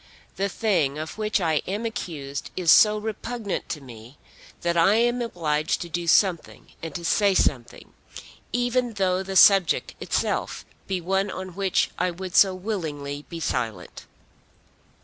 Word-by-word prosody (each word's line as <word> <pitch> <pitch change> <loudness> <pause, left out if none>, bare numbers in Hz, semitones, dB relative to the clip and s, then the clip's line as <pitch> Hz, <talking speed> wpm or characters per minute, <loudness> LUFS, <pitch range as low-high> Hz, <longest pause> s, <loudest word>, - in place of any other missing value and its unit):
The 200 +1 -1
thing 170 -11 0
of 155 +7 -6
which 215 -1 0
I 160 -4 +1
am 205 +4 -3
accused 155 - -5
is 175 -3 +4
so 210 0 +6
repugnant 220 0 -4
to 150 - -4
me, 120 +1 -13 0.4
that 170 0 0
I 170 +5 +4
am 240 +2 +2
obliged 155 -9 -1
to 170 - -6
do 170 +1 -3
something 175 0 +1
and 165 - -7
to 170 -1 -5
say 200 +1 +3
something, 125 -9 -1 0.6
even 245 0 0
though 190 -2 0
the 190 0 -6
subject 195 -2 +5
itself - - -2 0.2
be 190 -2 -2
one 195 +3 0
on 185 0 -6
which 190 +1 0
I 180 +1 +1
would 180 +1 -7
so 190 -2 +6
willingly 150 -8 -5
be 170 - -6
silent." 115 - -4
185 Hz, 150 wpm, -24 LUFS, 155-205 Hz, 0.6 s, so